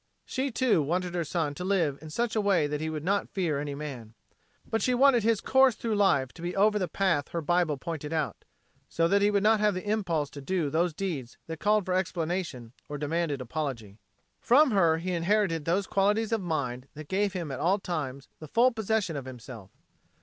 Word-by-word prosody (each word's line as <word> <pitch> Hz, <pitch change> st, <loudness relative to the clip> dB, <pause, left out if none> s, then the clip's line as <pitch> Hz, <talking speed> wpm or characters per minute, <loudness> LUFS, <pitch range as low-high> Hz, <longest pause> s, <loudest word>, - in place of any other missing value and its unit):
She, 265 Hz, +2 st, -2 dB
too, 235 Hz, -7 st, +2 dB
wanted 175 Hz, +4 st, -1 dB
her 175 Hz, -1 st, 0 dB
son 155 Hz, -1 st, -2 dB
to 180 Hz, -, -6 dB
live 175 Hz, -7 st, +1 dB
in 155 Hz, -, -9 dB
such 235 Hz, +8 st, -1 dB
a 215 Hz, -, +2 dB
way 195 Hz, -6 st, +3 dB
that 145 Hz, 0 st, -3 dB
he 160 Hz, -, -2 dB
would 155 Hz, -2 st, -4 dB
not 200 Hz, +3 st, 0 dB
fear 165 Hz, -7 st, -1 dB
any 145 Hz, -1 st, -4 dB
man. 130 Hz, -7 st, -7 dB, 0.5 s
But 225 Hz, -, -1 dB
she 250 Hz, -, +2 dB
wanted 265 Hz, -2 st, +5 dB
his 225 Hz, -1 st, +2 dB
course 265 Hz, -3 st, +4 dB
through 230 Hz, -2 st, -2 dB
life 140 Hz, -11 st, +2 dB
to 165 Hz, -, -12 dB
be 175 Hz, +1 st, -3 dB
over 210 Hz, +2 st, +3 dB
the 185 Hz, -, -1 dB
path 170 Hz, -4 st, 0 dB
her 170 Hz, -, -3 dB
Bible 170 Hz, -2 st, +1 dB
pointed 155 Hz, -1 st, -5 dB
out, 155 Hz, -3 st, -2 dB, 0.5 s
so 165 Hz, 0 st, +1 dB
that 200 Hz, +3 st, +3 dB
he 205 Hz, -, +4 dB
would 200 Hz, -1 st, +1 dB
not 215 Hz, 0 st, +4 dB
have 210 Hz, -2 st, +2 dB
the 185 Hz, +3 st, -5 dB
impulse 175 Hz, -9 st, 0 dB
to 145 Hz, -, -9 dB
do 160 Hz, -1 st, -1 dB
those 170 Hz, +1 st, +1 dB
deeds 155 Hz, -11 st, -4 dB
that 160 Hz, -1 st, -7 dB
called 210 Hz, -1 st, +2 dB
for 185 Hz, -, -1 dB
explanation 170 Hz, -9 st, -2 dB, 0.2 s
or 145 Hz, -, -4 dB
demanded 150 Hz, -1 st, -1 dB
apology. 120 Hz, -6 st, -5 dB, 0.4 s
From 275 Hz, +3 st, +5 dB
her 170 Hz, -6 st, +3 dB
he 180 Hz, +3 st, -3 dB
inherited 170 Hz, -2 st, +1 dB
those 185 Hz, +4 st, +1 dB
qualities 205 Hz, +4 st, +1 dB
of 225 Hz, -2 st, +1 dB
mind 135 Hz, -7 st, -3 dB
that 155 Hz, 0 st, -9 dB
gave 195 Hz, +2 st, 0 dB
him 170 Hz, -6 st, -4 dB
at 130 Hz, -, -5 dB
all 185 Hz, +4 st, +2 dB
times 150 Hz, -8 st, -4 dB
the 155 Hz, -, -9 dB
full 240 Hz, -, +4 dB
possession 220 Hz, -6 st, -1 dB
of 140 Hz, -2 st, -5 dB
himself. 120 Hz, -5 st, -10 dB
170 Hz, 215 wpm, -28 LUFS, 150-205 Hz, 0.5 s, wanted